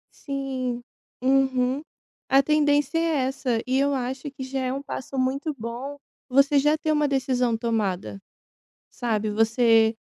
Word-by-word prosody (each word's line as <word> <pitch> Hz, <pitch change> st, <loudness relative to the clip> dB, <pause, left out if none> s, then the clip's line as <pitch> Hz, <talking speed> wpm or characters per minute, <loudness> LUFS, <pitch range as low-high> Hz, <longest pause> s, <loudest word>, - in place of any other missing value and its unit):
Sim, 260 Hz, -3 st, -4 dB, 0.4 s
uhum, 265 Hz, 0 st, +2 dB, 0.5 s
a 270 Hz, +1 st, +6 dB
tendência 295 Hz, +1 st, +2 dB
é -, -, +2 dB, 0.3 s
essa, 250 Hz, -4 st, -1 dB
e 260 Hz, +1 st, +1 dB
eu 280 Hz, 0 st, +2 dB
acho 260 Hz, +1 st, -3 dB
que 265 Hz, -, -7 dB
já 265 Hz, +1 st, -3 dB
é 255 Hz, 0 st, -1 dB
um 275 Hz, -, -4 dB
passo 270 Hz, -1 st, -6 dB
muito 275 Hz, +4 st, 0 dB
bom 240 Hz, +5 st, -6 dB, 0.3 s
você 275 Hz, +2 st, +4 dB
já 300 Hz, +2 st, +3 dB
ter 310 Hz, 0 st, -1 dB
uma 300 Hz, -1 st, +2 dB
decisão 250 Hz, -4 st, +1 dB
tomada, 200 Hz, -4 st, -2 dB, 0.7 s
sabe, 220 Hz, -3 st, -1 dB
você 225 Hz, +1 st, +4 dB
260 Hz, 145 wpm, -25 LUFS, 235-275 Hz, 0.7 s, a